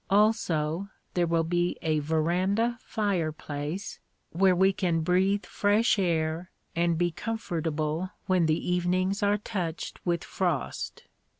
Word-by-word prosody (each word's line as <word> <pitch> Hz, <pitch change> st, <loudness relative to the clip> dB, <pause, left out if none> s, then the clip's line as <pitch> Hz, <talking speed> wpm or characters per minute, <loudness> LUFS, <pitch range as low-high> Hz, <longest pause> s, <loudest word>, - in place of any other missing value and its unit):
Also, 195 Hz, -4 st, +2 dB, 0.2 s
there 175 Hz, -1 st, +2 dB
will 165 Hz, 0 st, +2 dB
be 175 Hz, +1 st, 0 dB
a 155 Hz, -2 st, +2 dB
veranda 180 Hz, +10 st, +1 dB
fireplace, 160 Hz, -4 st, -2 dB, 0.3 s
where 185 Hz, +2 st, +4 dB
we 190 Hz, +2 st, +4 dB
can 170 Hz, -3 st, 0 dB
breathe 190 Hz, +4 st, +2 dB
fresh 210 Hz, +2 st, +2 dB
air 165 Hz, -1 st, 0 dB, 0.3 s
and 170 Hz, 0 st, +2 dB
be 175 Hz, +1 st, +1 dB
comfortable 165 Hz, -5 st, -2 dB, 0.2 s
when 185 Hz, -4 st, +3 dB
the 155 Hz, +1 st, 0 dB
evenings 185 Hz, +3 st, +1 dB
are 205 Hz, 0 st, +3 dB
touched 180 Hz, -6 st, -4 dB
with 175 Hz, -1 st, 0 dB
frost. 175 Hz, -7 st, -2 dB
175 Hz, 120 wpm, -28 LUFS, 160-195 Hz, 0.3 s, where